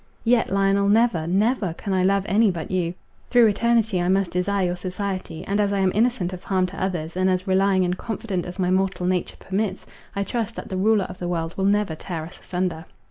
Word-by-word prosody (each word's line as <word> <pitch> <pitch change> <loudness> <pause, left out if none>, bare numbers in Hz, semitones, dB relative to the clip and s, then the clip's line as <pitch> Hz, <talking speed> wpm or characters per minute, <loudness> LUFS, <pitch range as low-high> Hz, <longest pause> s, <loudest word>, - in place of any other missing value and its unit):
Yet, 235 -3 +2
Lionel, 195 0 +2
never, 210 -7 +3
never, 200 0 +1
can 200 +1 -4
I 185 -1 +2
love 195 +1 +2
any 210 +4 +4
but 170 -3 -4
you; 180 -2 -1 0.3
through 245 -2 +6
eternity 220 -2 +2
I 175 - 0
must 190 0 +2
desire 190 +2 0
your 175 0 -1
society; 185 -2 -4
and, 200 +1 0
as 200 -1 +1
I 200 - 0
am 190 -1 +2
innocent 215 -5 +1
of 180 - -8
harm 185 -2 +1
to 185 +1 -5
others, 170 -4 -3
and 185 +1 +2
as 185 0 0
relying 190 -1 +3
and 180 0 0
confident 205 -4 -4
as 180 - -7
my 180 -2 +1
mortal 190 -1 0
nature 180 -1 -1
permits, 195 0 -3 0.3
I 200 - 0
trust 225 +1 -3
that - - -7
the 190 - -3
Ruler 205 0 +3
of 180 0 -9
the 175 - -3
world 165 -1 -2
will 190 - -1
never 205 -3 +2
tear 160 0 -5
us 170 - -12
asunder." 180 -2 -3
190 Hz, 225 wpm, -23 LUFS, 180-200 Hz, 0.3 s, through